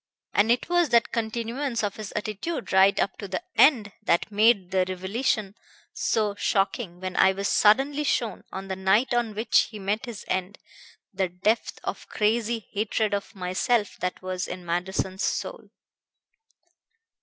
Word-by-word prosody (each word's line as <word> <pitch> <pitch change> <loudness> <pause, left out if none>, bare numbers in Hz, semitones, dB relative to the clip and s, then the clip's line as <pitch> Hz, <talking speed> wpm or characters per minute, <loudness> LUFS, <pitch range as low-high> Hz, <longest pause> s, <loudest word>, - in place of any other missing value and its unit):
And 215 +3 +4
it 245 - +1
was 350 -2 +2
that 235 -1 +3
continuance 235 +2 -2
of 200 -1 -2
his 215 -3 -6
attitude 215 - -4
right 190 +1 +5
up 195 - -1
to 200 - -5
the 185 -1 -4
end 235 -8 +5
that 170 +5 +1
made 205 -3 +3
the 190 -1 +3
revelation 195 +2 -1 0.4
so 210 -2 0
shocking 195 -2 -1
when 185 0 -5
I 190 - +5
was 200 +1 -2
suddenly 270 +8 +3
shown, 235 -7 -1
on 190 0 -6
the 190 - -3
night 195 +7 +2
on 235 -3 0
which 220 +3 +3
he 215 - -9
met 210 +5 -2
his 230 -4 -7
end, 185 +2 -2 0.6
the 190 -1 0
depth 195 +6 -1
of - - -5
crazy 225 +1 0
hatred 210 0 0
of 200 +2 -3
myself 195 +4 0
that 180 0 -3
was 185 -1 -3
in 180 0 -7
Manderson's 185 +2 -2
soul." - - -3
205 Hz, 155 wpm, -26 LUFS, 190-230 Hz, 0.6 s, right